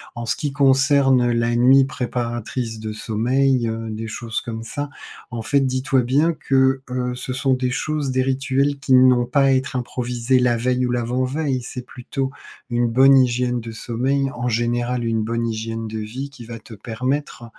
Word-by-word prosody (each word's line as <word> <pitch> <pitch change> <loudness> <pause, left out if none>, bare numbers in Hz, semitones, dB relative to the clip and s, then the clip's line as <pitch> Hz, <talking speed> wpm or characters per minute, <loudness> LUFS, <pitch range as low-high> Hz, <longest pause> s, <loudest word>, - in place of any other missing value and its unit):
En 120 0 -5
ce - - 0
qui 145 -2 -3
concerne 135 -2 +4
la 115 0 +1
nuit 130 +3 +6
préparatrice 120 -2 -4
de 110 0 -5
sommeil, 120 +4 +1
heu, 115 0 -4
des 110 +1 -5
choses 110 0 -4
comme 115 -1 -6
ça, 145 +5 -5 0.4
en 115 - -4
fait, 140 +5 +2
dis-toi 130 0 +1
bien 145 +7 +2
que, 135 -2 +2
heu, 125 0 -2
ce 125 +1 -4
sont 130 0 +1
des 125 0 -1
choses, 145 0 -2
des 130 0 +1
rituels 135 +1 0
qui 135 -1 +1
n'ont 125 -1 +6
pas 140 +3 +1
à - - +4
être 130 +1 0
improvisés 125 0 0
la 125 -1 +2
veille 125 +2 0
ou 125 - -1
l'avant-veille. 130 +3 -1
C'est 125 -1 -6
plutôt 130 +2 -4 0.4
une 120 0 +1
bonne 135 +4 +6
hygiène 125 -1 +2
de 115 0 -7
sommeil, 130 +5 -1
en 125 0 -3
général 120 +1 0
une 115 -1 0
bonne 115 +1 -1
hygiène 115 0 -4
de 110 - -5
vie 125 +6 -5
qui 135 -4 -12
va 115 0 -8
te 110 +1 -13
permettre, 125 +5 -3
125 Hz, 185 wpm, -21 LUFS, 115-135 Hz, 0.4 s, nuit